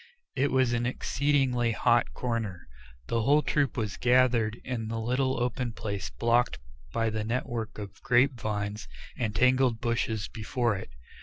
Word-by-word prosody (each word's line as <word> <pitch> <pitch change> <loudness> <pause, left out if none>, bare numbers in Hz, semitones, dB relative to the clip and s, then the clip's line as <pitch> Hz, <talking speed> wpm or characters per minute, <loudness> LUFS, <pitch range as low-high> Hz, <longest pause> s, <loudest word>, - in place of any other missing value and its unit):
It 140 +2 +2
was 130 -2 +2
an 120 0 0
exceedingly 130 -3 +1
hot 120 +1 +2
corner. 115 - -3 0.4
The 115 - 0
whole 145 +6 +4
troop 140 -1 0
was 105 -3 -2
gathered 120 -3 +3
in 115 -4 -3
the 115 +1 -3
little 130 +3 0
open 125 0 -1
place 100 -3 -4
blocked 120 +1 +1 0.3
by 115 -1 0
the 110 0 -2
network 115 -1 -3
of 100 -2 -8
grape 130 +2 +4
vines 105 -1 -3 0.3
and 110 -4 -2
tangled 125 -2 +3
bushes 115 -3 -1
before 115 -1 -1
it. 95 - -7
120 Hz, 150 wpm, -28 LUFS, 110-125 Hz, 0.4 s, whole